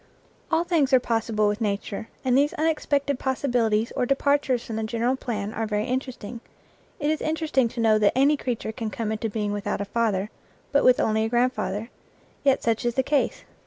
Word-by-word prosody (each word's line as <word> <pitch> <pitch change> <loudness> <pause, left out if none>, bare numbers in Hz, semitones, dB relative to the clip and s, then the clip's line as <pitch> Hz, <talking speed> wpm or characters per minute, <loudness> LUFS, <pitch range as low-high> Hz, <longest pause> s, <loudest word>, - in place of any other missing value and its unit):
All 325 0 +2
things 315 -7 +1
are 260 - +8
possible 225 -3 0
with 205 +2 -1
nature, 205 +1 -2 0.2
and 250 -1 +3
these 285 +2 +3
unexpected 285 -3 0
possibilities 240 -5 0
or 250 - 0
departures 275 -2 +1
from 225 - -5
the 220 - -2
gen 225 +1 -3
eral 255 +3 +1
plan 215 -4 -3
are 225 0 -2
very 210 0 -1
interesting. 250 -3 -4 0.6
It 295 +1 +1
is 315 - -2
interesting 310 -5 +1
to 235 +1 -8
know 220 -2 +4
that 210 +3 +3
any 280 +3 +5
creature 245 -5 -3
can 225 -1 -4
come 215 0 -3
into 220 +1 -2
being 210 -1 -2
without 205 -1 -2
a 200 - -2
father, 210 -2 0 0.4
but 285 - +3
with 255 -1 +5
only 220 0 +2
a - - -2
grandfather, 240 -3 0 0.5
yet 275 -2 +3
such 230 -1 +1
is 240 -1 0
the 265 - +2
case. 290 +1 0
240 Hz, 200 wpm, -25 LUFS, 220-270 Hz, 0.6 s, are